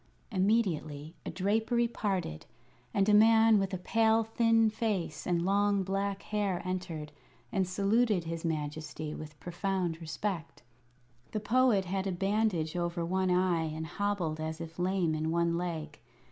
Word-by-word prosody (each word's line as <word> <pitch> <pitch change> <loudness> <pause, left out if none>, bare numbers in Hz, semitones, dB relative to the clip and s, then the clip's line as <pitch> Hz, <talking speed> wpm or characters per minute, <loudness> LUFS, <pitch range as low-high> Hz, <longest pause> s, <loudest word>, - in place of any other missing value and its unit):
Immediately 185 -7 0
a - - -1
drapery 220 +6 +1
parted, 190 - -3 0.4
and 195 +6 +2
a 210 - +4
man 220 0 +6
with 195 -1 -1
a 190 - -2
pale, 225 +4 +3
thin 225 0 +3
face 205 -8 -2
and 175 -1 +1
long 200 0 +2
black 195 +1 -2
hair 205 -4 -1
entered 180 -5 -4 0.4
and 190 -3 +1
saluted 200 +1 +2
his 165 0 -5
Majesty 155 -1 -3
with 155 -1 -9
profound 175 -2 -2
respect. 165 -2 -4 0.7
The 215 - 0
Poet 220 -2 +3
had 190 +2 -2
a - - 0
bandage 195 -3 0
over 175 -1 -1
one 185 +2 0
eye 180 -2 +2
and 160 0 -4
hobbled 175 -3 -2
as 160 0 -4
if 165 +1 -8
lame 180 -2 +1
in 155 +1 -1
one 170 0 +1
leg. 165 -4 -4
185 Hz, 145 wpm, -31 LUFS, 165-205 Hz, 0.7 s, man